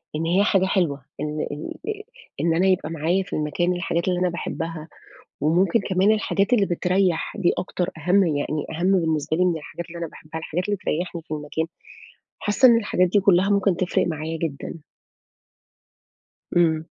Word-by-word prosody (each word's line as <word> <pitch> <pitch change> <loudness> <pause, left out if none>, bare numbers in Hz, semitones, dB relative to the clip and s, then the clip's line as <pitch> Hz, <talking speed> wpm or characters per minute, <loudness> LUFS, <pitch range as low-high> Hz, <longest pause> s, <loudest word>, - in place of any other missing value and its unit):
إن 160 +2 -1
هي 180 +4 +3
حاجة 195 -3 +3
حلوة، 165 -9 0
ال - - -2 0.3
ال 145 +2 -5
آآ 425 -1 -3 0.4
إن 165 -1 +2
أنا 185 +3 +3
يبقى 185 -4 +1
معايا 165 +4 0
في - - -11
المكان 165 +4 0
الحاجات 175 -1 -1
اللي 180 -1 +1
أنا 180 0 +2
باحبها، 165 -2 -5 0.5
وممكن 175 +8 +3
كمان 195 +1 +2
الحاجات 210 +1 +1
اللي 210 -5 +4
بتريّح، 180 -1 0
دي 175 - +2
أكتر، 180 -1 -2
أهَم 180 +5 +3
يعني 150 0 -1
أهَم 175 +4 +1
بالنسبة 160 -1 0
لي 180 - +3
من 175 -2 +1
الحاجات 165 +2 -7
اللي 170 +1 -9
أنا 170 - -3
باحبها، 160 +1 -9
الحاجات 170 +3 -3
اللي 205 -1 -1
تريّحني 175 -2 -3
في 155 - -20
المكان. 150 +2 -2 0.7
حاسّة 215 +5 +4
إن 235 -2 +6
الحاجات 205 -4 +2
دي 205 +4 +3
كلها 195 0 +4
ممكن 200 -2 +3
تفرِق 185 -1 +1
معايا 160 0 -3
جدًا. 160 +1 -4 1.8
أمم. 160 -2 +3
175 Hz, 175 wpm, -23 LUFS, 160-190 Hz, 1.8 s, إن